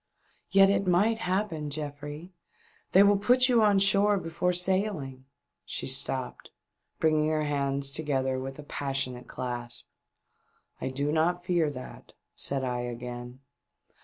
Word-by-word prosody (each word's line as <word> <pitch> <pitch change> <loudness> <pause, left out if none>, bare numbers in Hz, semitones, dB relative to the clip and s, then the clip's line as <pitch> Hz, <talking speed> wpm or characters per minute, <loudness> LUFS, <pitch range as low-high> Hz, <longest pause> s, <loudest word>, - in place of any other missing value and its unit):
" - - -35
Yet 195 0 +6
it 200 -1 0
might 205 +6 +3
happen, 180 -6 -1
Geoffrey! 145 +3 -6 0.6
They 195 - +7
will 200 0 +4
put 250 +5 +4
you 240 -3 +4
on 205 -2 +4
shore 200 +1 +4
before 175 0 -1
sailing 180 -8 -1 0.2
" - - -56
She - - -5
stopped, - - -2 0.5
bringing 155 -1 +3
her 155 -1 +1
hands 140 -1 -1
together 135 -3 0
with 135 +1 -6
ix 150 - -10
passionate 135 -3 -3
clasp. 120 -1 -5 0.5
" - - -40
I - - -2
do 140 +3 -1
not 175 +3 +1
fear 175 -4 +2
that," 130 -3 -10 0.2
said 135 -1 -1
I 125 -1 -1
again. 120 +1 -6
155 Hz, 145 wpm, -28 LUFS, 135-190 Hz, 0.6 s, They